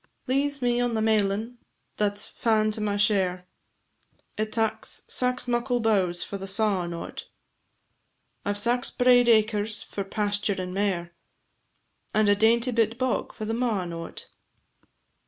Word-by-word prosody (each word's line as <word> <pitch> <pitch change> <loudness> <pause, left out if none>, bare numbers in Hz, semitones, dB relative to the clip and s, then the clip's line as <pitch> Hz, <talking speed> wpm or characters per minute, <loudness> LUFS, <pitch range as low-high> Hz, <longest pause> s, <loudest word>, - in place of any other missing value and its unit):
Leeze 275 +1 0
me 245 0 +2
on 245 -1 0
the - - 0
mailin 220 +2 0 0.4
that 205 -1 0
's 205 - -3
fa'n 215 -2 +1
to 215 - -5
my 205 -1 0
share, 190 -3 +1 0.9
It 215 0 -2
taks 220 -1 -1
sax 250 0 +1
muckle 245 +1 0
bowes 190 -6 +1
for 200 - -6
the 195 - -6
sawin' 195 -3 0
o't; 170 - -7 1.1
I 205 - -1
've - - -3
sax 240 +4 +2
braid 245 -1 +4
acres 215 -1 +2
for 200 - -5
pasture, 205 0 -1
and 180 0 -4
mair, 185 -4 -1 1.0
And 215 -1 +3
a 205 - +5
dainty 230 +4 +3
bit 225 -1 +1
bog 255 -1 -1
for 215 - -7
the 225 - -2
mawin' 215 -8 -1
o't. 165 0 -7
215 Hz, 150 wpm, -26 LUFS, 200-235 Hz, 1.1 s, a